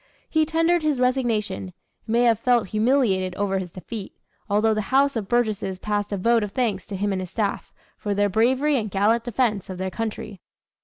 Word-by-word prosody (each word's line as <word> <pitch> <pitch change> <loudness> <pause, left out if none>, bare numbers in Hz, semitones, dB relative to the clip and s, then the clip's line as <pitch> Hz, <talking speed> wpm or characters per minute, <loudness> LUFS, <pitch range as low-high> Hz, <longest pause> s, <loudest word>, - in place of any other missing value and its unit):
He 315 -1 +1
tendered 330 +2 +2
his 300 -4 0
resignation, 240 - 0
and 90 - -11 0.3
may 235 +2 +2
have 230 -3 +3
felt 235 -4 +2
humiliated 215 -5 +1
over 195 -1 0
his 180 -2 -6
defeat; 195 +3 -8 0.3
although 215 +2 +3
the 215 -2 -3
House 275 +1 +3
of 215 -4 -3
Burgesses 215 -5 0
passed 205 +1 -2
a 200 - -1
vote 230 +4 +3
of 205 -1 -5
thanks 220 -7 -1
to 200 - -5
him 205 +2 -1
and 190 -1 -1
his 185 - -6
staff, 200 +1 -2 0.3
"for 205 -1 -2
their 205 0 +2
bravery 260 +8 +2
and 215 -3 -2
gallant 215 +4 +2
defense 225 -5 0
of 185 - -5
their 190 0 -3
country." 220 -3 -5
215 Hz, 200 wpm, -24 LUFS, 195-245 Hz, 0.3 s, have